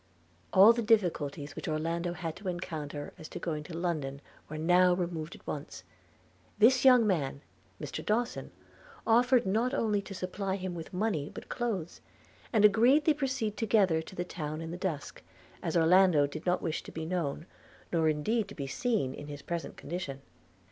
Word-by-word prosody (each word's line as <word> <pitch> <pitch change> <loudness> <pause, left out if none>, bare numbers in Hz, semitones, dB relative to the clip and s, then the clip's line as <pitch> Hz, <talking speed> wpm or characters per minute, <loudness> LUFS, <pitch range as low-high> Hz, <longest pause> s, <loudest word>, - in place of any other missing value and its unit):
All 200 +5 +8
the 235 - -1
difficulties 165 -10 +1
which - - -6
Orlando 165 +2 -1
had 165 -2 -5
to 195 +1 -8
encounter 155 -5 -5
as 160 - -8
to - - -7
going 155 -3 -3
to 165 0 -7
London 155 -6 -2 0.3
were 155 - -5
now 180 +3 +4
removed 170 -2 -4
at - - -17
once - - -6 0.4
– - - -33
This 245 +4 +5
young 250 -3 +7
man, 145 -8 0 0.4
Mr - - -5
Dawson, 235 +3 -1 0.6
offered 245 +1 +4
not 230 +7 +1
only 210 -6 +1
to 195 0 -9
supply 190 +1 -3
him 185 -2 -4
with 165 -2 -7
money 180 -7 -1
but - - -10
clothes; 210 -9 -3 0.5
and 220 -3 +3
they - - +11
agreed 245 +9 +4
to 310 - +5
proceed 260 -7 -2
together 195 -7 +3
to 175 - -11
the 175 - -2
town 155 -3 -5
in 165 0 -6
the - - -4
dusk, 175 -6 -4 0.4
as - - -1
Orlando 170 -2 +5
did 155 +4 -7
not 180 - +1
wish 160 -3 -2
to - - -11
be 160 0 -5
known, 165 -3 -2 0.5
nor 160 -2 +3
indeed 205 +9 0
to - - -11
be 140 - -4
seen, 200 - -1
in 145 - -9
his 145 -1 -8
present 170 -1 -4
condition. 140 -4 -5
180 Hz, 185 wpm, -30 LUFS, 155-215 Hz, 0.6 s, they